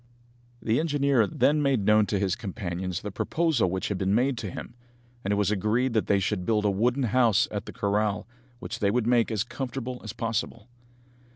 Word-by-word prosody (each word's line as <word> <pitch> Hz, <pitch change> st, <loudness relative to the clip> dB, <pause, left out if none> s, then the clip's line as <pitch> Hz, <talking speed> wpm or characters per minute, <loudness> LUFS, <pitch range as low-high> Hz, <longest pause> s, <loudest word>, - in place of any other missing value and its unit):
The 115 Hz, +1 st, +2 dB
engineer 140 Hz, -7 st, +2 dB
then 150 Hz, +9 st, +2 dB
made 135 Hz, -8 st, +1 dB
known 105 Hz, 0 st, +4 dB
to 100 Hz, -, 0 dB
his 95 Hz, -1 st, 0 dB
companions 90 Hz, -3 st, -4 dB
the 105 Hz, -, -4 dB
proposal 155 Hz, -, +1 dB
which 95 Hz, +1 st, -2 dB
had 100 Hz, -3 st, -2 dB
been 95 Hz, +1 st, +1 dB
made 130 Hz, +3 st, +2 dB
to 105 Hz, -, -4 dB
him, 115 Hz, -, -8 dB, 0.5 s
and 100 Hz, -, -1 dB
it -, -, +3 dB
was 100 Hz, -1 st, +1 dB
agreed 110 Hz, +5 st, +1 dB
that 110 Hz, -, +1 dB
they 100 Hz, -, +3 dB
should 95 Hz, 0 st, -1 dB
build 105 Hz, +2 st, +1 dB
a 100 Hz, -, +3 dB
wooden 120 Hz, +7 st, +1 dB
house 120 Hz, -3 st, +3 dB
at 105 Hz, -2 st, -4 dB
the -, -, -6 dB
corral, 105 Hz, 0 st, 0 dB, 0.3 s
which 110 Hz, -2 st, -6 dB
they 100 Hz, -, +2 dB
would 120 Hz, +2 st, +1 dB
make 120 Hz, -1 st, +3 dB
as 105 Hz, -3 st, 0 dB
comfortable 125 Hz, 0 st, -5 dB
as 110 Hz, -, -5 dB
possible. 115 Hz, 0 st, -3 dB
110 Hz, 200 wpm, -27 LUFS, 100-125 Hz, 0.5 s, known